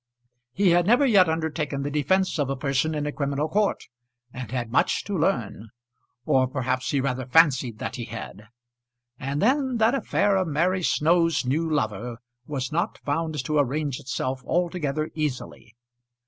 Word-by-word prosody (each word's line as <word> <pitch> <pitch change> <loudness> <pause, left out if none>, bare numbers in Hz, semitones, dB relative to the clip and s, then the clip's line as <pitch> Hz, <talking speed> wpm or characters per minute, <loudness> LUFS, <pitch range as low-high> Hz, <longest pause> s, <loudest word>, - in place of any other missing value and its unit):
He 195 +7 +2
had 175 +1 +3
never 245 +6 +5
yet 195 -9 +5
undertaken 155 -3 -2
the 145 - -3
defence 165 +5 +1
of 140 -2 0
a 135 - -1
person 135 +3 0
in 150 -1 -2
a 150 - -2
criminal 140 0 -1
court, 205 +5 0 0.5
and 125 -3 -6
had 120 -2 -3
much 130 - +2
to 205 - -4
learn, 120 - -1 0.6
or 130 -1 +3
perhaps 130 -1 -2
he 140 - +1
rather 130 -2 -2
fancied 130 -6 +3
that - - -5
he 120 - -5
had. 105 -2 -8 0.7
And 140 +4 -2
then 260 +1 +2
that 225 +2 +3
affair 205 -7 +1
of 185 -2 0
Mary 175 +5 +1
Snow's 165 -2 +2
new 160 +6 0
lover 115 -5 -2 0.3
was 135 -2 -3
not 170 +3 -1
found 150 -2 -2
to 150 +1 +1
arrange 145 0 -1
itself 130 -1 -3
altogether 160 -3 -1
easily. 135 -6 -5
150 Hz, 160 wpm, -25 LUFS, 130-170 Hz, 0.7 s, never